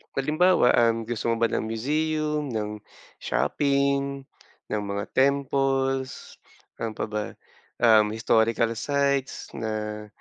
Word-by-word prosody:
Halimbawa, 155 +1 +3
um, 115 -1 +2
gusto 115 0 -3
mo 115 - +2
ba 115 -1 +1
ng - - -1
museum? 150 +5 -1
Ng 105 -3 -4 0.4
shopping? 140 -1 0 0.5
Ng 105 - 0
mga 100 +1 -4
temples? 135 -1 0 0.4
Ano 110 -1 -3
paba, 105 -1 -4 0.5
um, 110 -2 +5
historical 115 +1 +2
sites? 140 +1 -1
Na, 105 -1 -4
125 Hz, 105 wpm, -25 LUFS, 110-140 Hz, 0.5 s, um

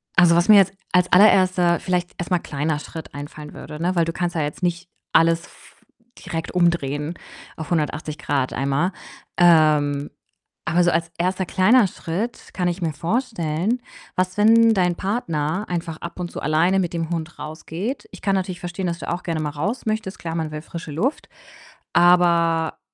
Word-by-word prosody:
also, 170 -1 +6
was 175 +5 +2
mir 210 - +9
jetzt 195 0 +4 0.2
als 180 0 +3
allererster, 185 -3 +5
vielleicht 180 -1 -1
erst 175 +1 -5
mal 180 - +3
kleiner 150 0 -2
Schritt 160 0 -9
einfallen 150 +1 -8
würde, 150 +2 -9
ne, 180 +2 0
weil 170 -1 +3
du 165 - -2
kannst 175 -1 -2
ja 160 - 0
jetzt 145 +5 -5
nicht 175 0 -2 0.2
alles 165 0 +4
f - - -19 0.5
direkt 165 0 -4
umdrehen 170 -3 0 0.4
auf 160 +2 -8
180 155 -1 -1
Grad 135 -3 -1
einmal. 140 +7 0 0.5
Ähm, 155 -4 +4 0.6
aber 175 +2 +2
so 175 - +3
als 165 0 0
1. 185 +2 0
kleiner 195 +5 +4
Schritt 190 +8 -5
kann 180 -1 -1
ich 175 +1 -2
mir 160 -2 0
vorstellen, 195 - -1 0.3
was, 185 +1 -1
wenn 225 +2 +6
dein 180 -3 +1
Partner 185 -3 -2
einfach 165 -2 -3
ab 170 +1 -8
und 175 -1 -3
zu - - -6
alleine 170 +5 +2
mit 175 -3 -1
dem 165 -1 -2
Hund 170 0 -4
rausgeht? 165 - -5
Ich - - -12
kann 195 -1 +1
natürlich 185 -2 -3
verstehen, 175 +1 -4
dass 170 0 -3
du - - -6
auch 175 +1 -3
gerne 165 -2 -2
mal 150 - -2
raus 200 - -3
möchtest. 215 -3 -2
Klar, 165 -1 -5
man 160 -2 -2
will 150 0 -5
frische 165 -2 -8
Luft. 230 - -2 0.6
Aber, 170 -2 +3
170 Hz, 180 wpm, -22 LUFS, 160-185 Hz, 0.6 s, mir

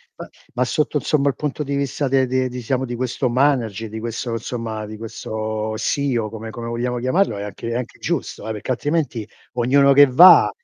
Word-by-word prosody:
ma - - -9 0.2
ma 125 0 +1
sotto 150 +3 0
insomma 145 0 +1
il 135 - +1
punto 150 0 -3
di 140 0 -3
vista 140 0 -1
de 130 0 +3
de 130 0 0
diciamo 125 +1 -2
di 120 -1 -5
questo 125 +1 -1
manager, 120 -5 +1
di 110 - -6
quesso 115 +1 -4
insomma, 115 -1 -4
di 110 0 -8
questo 110 -1 -4
CEO 120 -5 -1
come 110 0 -7
come 115 +1 -7
vogliamo 120 +1 -2
chiamarlo, 130 - +1
è 100 - -4
anche 105 +3 -6
è 115 - -2
anche 125 -1 -5
giusto - - -3
eh, - - -2
perché 110 +4 -4
altrimenti 130 -4 -1 0.3
ognuno 135 +3 +4
che 145 +1 +8
va, 170 +9 +8
125 Hz, 195 wpm, -21 LUFS, 110-135 Hz, 0.3 s, che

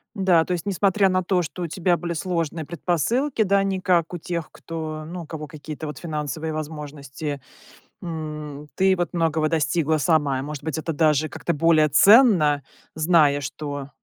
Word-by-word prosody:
Да, 185 -5 +3
то 180 - -3
есть 175 +1 -3
несмотря 195 0 +2
на 185 0 +1
то, 180 0 +1
что 175 +2 -6
у - - -1
тебя 175 +1 +1
были 170 0 -4
сложные 165 -2 -2
предпосылки, 220 - 0
да, 200 0 +3
не 195 -1 -1
как 180 -3 +1
у 175 - -4
тех, 170 -1 -4
кто, 155 -2 -6
ну, 175 +1 -6
у - - -11
кого 155 -1 -6
какие-то 155 0 -8
вот 150 - -6
финансовые 155 -1 -4
возможности, 150 -2 -6 0.6
м, 150 -3 -6
ты 190 0 +3
вот 175 -3 -2
многого 160 -2 +1
достигла 160 0 +1
сама. 145 -4 +1
Может 150 -1 -6
быть, 160 -1 -3
это 160 +1 -3
даже 155 -1 +2
как-то 160 +2 -3
более 155 0 +3
ценно, 175 - +6 0.3
зная, 155 -3 +3
что 145 0 -5
160 Hz, 170 wpm, -23 LUFS, 150-175 Hz, 0.6 s, ценно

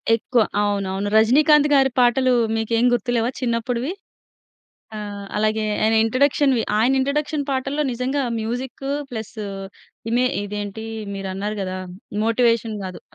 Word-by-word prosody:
ఎక్కువ 235 +1 +1 0.2
అవునవును. 200 -1 -1
'రజనీకాంత్' 290 +7 +5
గారి 270 -1 +5
పాటలు 250 +1 +4 0.2
మీకేం 225 +1 +1
గుర్తులేవా 240 0 0
చిన్నప్పుడివి? 240 +3 -1 1.1
ఆహ్, 205 -1 -6
అలాగే 215 +1 +1 0.2
ఆయన 220 +1 +3
ఇంట్రోడక్షన్‌వి 265 +1 +2 0.2
ఆయన 255 +5 +3
ఇంట్రోడక్షన్ 285 +2 -1
పాటల్లో 275 +2 -1
నిజంగా 255 +4 -1 0.2
మ్యూజిక్కు 250 +4 -4 0.2
ప్లస్ 220 -3 -6 0.8
ఇమే 245 +2 +2 0.2
ఇదేంటి 205 +1 -5 0.3
మీరన్నారు 195 +2 -4
గదా! 185 0 -4 0.5
మోటివేషన్ 230 -1 +2
గాదు 185 -1 -7
235 Hz, 110 wpm, -22 LUFS, 215-260 Hz, 1.1 s, రజనీకాంత్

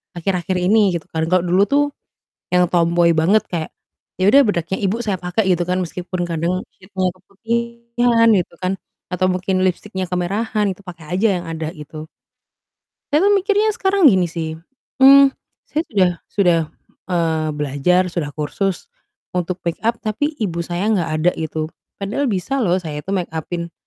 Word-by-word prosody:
akhir-akhir 180 +1 -1
ini 190 +1 +3
gitu 165 - -3
kan, 160 0 -1
kalau 180 +1 +2
dulu 180 +2 +2
tuh 285 +1 +3 0.7
yang 180 -1 +4
tomboy 170 -1 +3
banget, 180 +7 +4
kayak 165 -3 -3 0.5
ya 190 - +4
udah 275 +6 +7
bedaknya 175 -2 -1
ibu 195 +4 +1
saya 210 -5 -1
pakai 180 +3 -1
gitu 175 -1 +2
kan 180 +1 0
meskipun 180 +1 -4
kadang 170 +1 -1 0.2
shade-nya 185 -1 -2
keputihan 235 +4 0
gitu 180 - -1
kan, 185 0 0 0.4
atau 180 +1 +1
mungkin 185 +1 0
lipstiknya 190 +1 -2
kemerahan, 205 +5 -1
itu 190 - -7
pakai 175 -3 -10
aja 205 +4 +3
yang - - -9
ada 160 -1 -4
gitu. 155 -1 -9 1.1
Saya 305 +6 +3
tuh 410 - +5
mikirnya 410 +2 +2
sekarang 390 -2 +2
gini 185 - +5
sih, 160 -1 -4 0.5
mmm, 275 0 +8 0.3
saya 310 - -1
sudah 190 -4 +3 0.2
sudah, 180 -4 +3 0.5
eee, 160 -3 0
belajar, 150 +6 +2
sudah 170 -4 -3
kursus, 185 +5 -2 0.5
untuk 180 0 -2
make-up, 220 +7 -1
tapi 225 +8 -1
ibu 180 -8 -2
saya 175 +3 -3
enggak 205 -6 +1
ada 170 +3 +3
gitu. 155 0 -4 0.2
Padahal 220 +8 -1
bisa 235 +7 -1
loh 185 -5 +2
saya 155 -5 -5
tuh 195 +5 -2
make 175 -3 -4
up-in, 170 +1 -4
185 Hz, 160 wpm, -19 LUFS, 170-215 Hz, 1.1 s, mmm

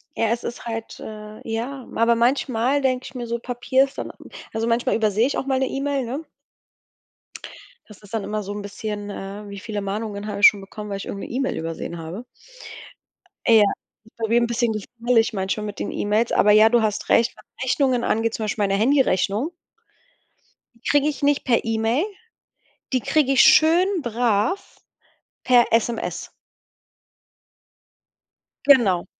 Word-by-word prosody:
Ja, 230 - +1
es 235 +2 -1
ist 240 - -6
halt 225 -1 -6
äh, 215 0 -9
ja 245 +4 -4
aber 230 +1 +4
manchmal 250 +2 +1
denke 255 -1 0
ich 260 - -10
mir 245 -1 -4
so, 235 0 -3
Papier 250 +2 +1
ist 275 - -15
dann - - -5
m - - -16 0.2
also 225 +1 -1
manchmal 235 +1 +1
übersehe 215 0 +2
ich 280 - -1
auch 270 - -5
mal 265 -1 +1
'ne 265 0 +1
E-Mail, 275 -1 -2
ne? 270 +7 -4 1.6
Das 210 -2 -15
ist 205 +1 -16
dann 220 -3 -1
immer 210 0 -3
so 200 - -5
'n 205 - -5
bisschen, 205 0 -6
äh 200 +1 -7
wie 200 - -7
viele 210 +1 -5
Mahnungen 205 +1 -4
habe 205 -1 -4
ich 205 - +10
schon 205 - +2
bekommen, 210 +2 -9
weil 200 - -3
ich 195 - -7
irgend 200 - -6
'ne - - -10
E-Mail 265 +2 -2
übersehen 165 +1 -5
habe. 170 +8 -7 1.2
Ja. 225 -2 +7 0.4
Ist 220 - -23
bei 225 -1 -2
mir 235 +1 +4
'n 235 - +1
bisschen 235 0 0
gefährlich 230 +2 0
manchmal 195 +2 -2
mit 205 -1 -7
den - - -3
E-Mails, 215 +3 0
aber 210 - +4
ja, 215 +1 +7
du 235 0 +3
hast 215 -1 -2
recht, 235 +2 +3
was - - -11
Rechnungen 255 -1 +1
angeht, 225 0 0
zum 220 - -3
Beispiel 210 0 -1
meine 195 -1 +1
Handyrechnung 250 - +2 1.3
die - - -1
kriege 290 0 +3
ich 295 -1 -3
nicht 285 0 +2
per 240 -3 +2
E-Mail, 225 - 0 0.9
die 255 - +2
kriege 280 +4 +1
ich 265 - +6
schön 320 +4 +6 0.2
brav 235 - -1 0.6
per 245 -1 +5
SMS. 230 0 -1 2.4
Genau. 220 -11 +5
230 Hz, 175 wpm, -22 LUFS, 210-255 Hz, 2.4 s, ich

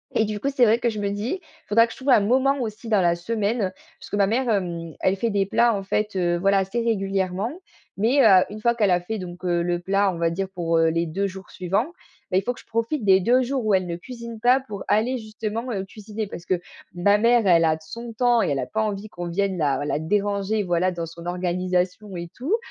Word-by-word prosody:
et - - +4
du 210 -1 -3
coup, 275 - -3
c'est 270 -3 +2
vrai 225 0 +5
que 240 - +1
je 215 -2 -4
me 200 - 0
dis: 210 - -3
«Il - - -25
faudra 230 +3 +5
que - - -11
je - - -10
trouve 270 +1 -3
un 220 - +6
moment 260 +6 +2
aussi 220 0 -5
dans 210 -3 +3
la 170 -1 +3
semaine», 205 +2 -1 0.3
parce - - -12
que - - -3
ma 200 -1 +3
mère, 245 +5 0
hem, 170 -5 -2
elle 190 +1 +2
fait 230 +4 0
des 200 -2 +1
plats, 235 +3 +3
en 195 - -3
fait, 210 +1 -1
heu, 175 -2 +1
voilà 195 +2 +3
assez 195 +5 -2
régulièrement, 195 -2 -1 0.5
mais, 235 +8 +3
heu, 190 -4 +7
une 215 +1 -8
fois 235 +1 +2
qu'elle 210 -5 +2
a 180 0 +3
fait 215 +5 -4
donc, 180 0 -8
heu, 175 -1 +1
le 175 0 0
plat, 195 +3 +1
on - - -6
va 165 0 +1
dire 190 +3 -2
pour, 165 -2 0
heu, 165 0 +4
les 165 +1 0
2 190 +5 -1
jours 190 0 -10
suivants, 195 - -1 0.4
bah, 185 - +3
il 195 - +2
faut 245 - -1
que - - -14
je - - -26
profite 230 +4 -2
des 190 -2 +5
2 245 +7 +3
jours 255 -1 -2
où 215 - +2
elle 185 -1 +2
ne 170 - -3
cuisine 235 +3 -9
pas, 250 +4 +4
pour 210 -7 -8
aller 240 +5 +2
justement, 220 +1 -5
heu, 195 -2 -2
cuisiner. 210 +2 -6
Parce 175 -3 -9
que 185 -2 0 0.3
ma 200 +4 +4
mère, 230 +1 +3
elle 170 -3 +5
a 160 -1 +3
d 160 - -14
son 235 +7 -8
temps 240 0 +3
et - - +1
elle 140 - 0
a - - -2
pas 220 - -1
envie 210 -1 -3
qu'on 175 -3 -6
vienne 190 +2 -1
la 145 -4 0
la 145 0 -1
déranger, 205 +4 0
voilà, 180 0 +1
dans 170 -1 -4
son 170 +1 -11
organisation, 180 +2 -1
et 170 -1 -6
tout, 300 - 0
200 Hz, 260 wpm, -24 LUFS, 180-225 Hz, 0.5 s, heu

